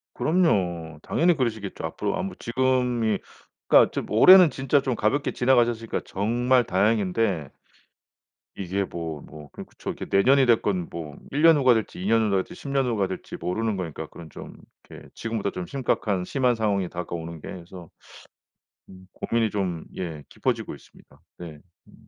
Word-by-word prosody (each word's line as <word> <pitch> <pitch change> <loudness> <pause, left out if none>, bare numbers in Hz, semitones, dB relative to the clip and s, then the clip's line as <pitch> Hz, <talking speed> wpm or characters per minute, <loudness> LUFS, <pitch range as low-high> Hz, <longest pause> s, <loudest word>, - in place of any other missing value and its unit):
그럼요. 90 - 0
당연히 175 0 +2
그러시겠죠, 110 - -3
앞으로. 195 - -3
아 185 - -2
뭐 195 - -5
지금이 125 -2 0 0.5
그니까 - - +6
지금 - - -4
올해는 180 - +8
진짜 135 +1 +1
좀 130 -3 -1
가볍게 125 +8 0
지나가셨으니까 120 -3 +1
정말 120 +5 +1
다행인데 100 -4 0 1.1
이게 100 +1 -2
뭐, 80 -5 -6
뭐 75 -1 -12
그럼 - - -9
그쵸. - - -7
이게 - - -7
내년이 130 +7 +4
됐건 105 -7 +1
뭐 75 -3 -7 0.2
1 145 +2 -1
년 165 -1 +7
후가 130 -3 +5
될지 110 -4 -3
2 - - -4
년 110 0 +3
후가 100 -1 +1
될지 - - -13
10 145 - -10
년 135 -1 +1
후가 105 -6 0
될지 95 - -7
모르는 110 +2 -2
거니까 80 -3 -5
그런 80 -2 -12
좀 - - -10 0.3
이렇게 - - -12
지금보다 110 -3 -3
좀 90 -1 -5
심각한 105 -8 -1
심한 125 +1 +1
상황이 100 -5 0
다가오는 85 -1 -6
게 - - -9
그래서 90 -1 -10 1.0
음 95 0 -15
고민이 115 -2 0
좀 90 -5 -3
예 80 -5 -5
깊어지고 - - -2
있습니다. - - -20 0.2
네. 80 -4 -9 0.3
음. - - -19
105 Hz, 340 characters per minute, -25 LUFS, 90-125 Hz, 1.1 s, 올해는